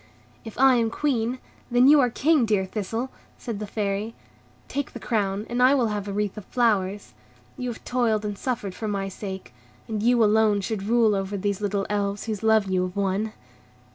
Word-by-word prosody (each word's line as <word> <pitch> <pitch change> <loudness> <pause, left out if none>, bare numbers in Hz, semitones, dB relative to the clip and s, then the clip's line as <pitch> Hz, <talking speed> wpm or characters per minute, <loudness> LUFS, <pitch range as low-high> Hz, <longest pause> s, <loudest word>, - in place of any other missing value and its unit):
"If 225 - -9
I 265 -1 +6
am 230 -1 +1
Queen, 245 -2 -1 0.3
then 245 +1 +5
you 295 +1 +8
are 250 -3 +4
King, 300 +3 +3
dear 205 -3 +2
Thistle," 225 +6 -4 0.3
said 230 -5 -5
the 210 - -5
Fairy. 205 +2 -2 0.5
"Take 285 -1 -4
the - - -7
crown, 205 -2 -1
and 245 +1 -1
I 260 +3 +6
will 240 -5 +2
have 205 -1 -3
a - - -3
wreath 205 0 -2
of 200 - -13
flowers. 205 -5 0 0.4
You 250 -2 -4
have 230 - -8
toiled 225 -4 +1
and 205 -1 -3
suffered 210 -4 -3
for 220 - -5
my 195 -1 -2
sake, 190 -1 -7 0.3
and 215 -2 -3
you 240 +1 +4
alone 215 -1 +3
should 210 +1 -3
rule 225 +1 +3
over 195 0 -2
these 200 +1 -2
little 200 -1 -1
Elves 205 -1 -1
whose 215 -3 -4
love 220 -2 +4
you 190 -1 0
have 180 0 -3
won." 200 +2 -1
215 Hz, 200 wpm, -25 LUFS, 200-235 Hz, 0.5 s, you